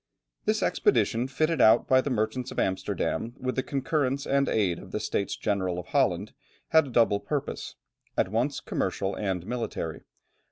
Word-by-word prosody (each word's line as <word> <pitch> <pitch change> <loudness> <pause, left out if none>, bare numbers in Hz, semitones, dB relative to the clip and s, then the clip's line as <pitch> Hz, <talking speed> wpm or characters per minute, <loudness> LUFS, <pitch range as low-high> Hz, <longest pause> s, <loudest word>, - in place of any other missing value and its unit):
This - - +1
expedition, 120 +3 +2
fitted 155 +5 +1
out 110 - +6
by 130 0 +5
the 140 - -3
merchants 120 +1 -1
of - - -9
Amsterdam 95 +3 -1
with 130 0 -3
the 130 - +1
concurrence 140 0 -1
and 140 0 +2
aid 95 -6 +1
of - - -12
the - - -2
States 100 - -1
General 95 -4 -1
of 90 - -5
Holland, 105 -8 +1 0.4
had 160 -2 +5
a - - -7
double 115 -4 +3
purpose; 145 +5 -4 0.4
at - - +2
once 120 +7 0
commercial 95 0 -2
and 95 -4 -2
military. 115 0 -4
120 Hz, 165 wpm, -27 LUFS, 100-135 Hz, 0.4 s, out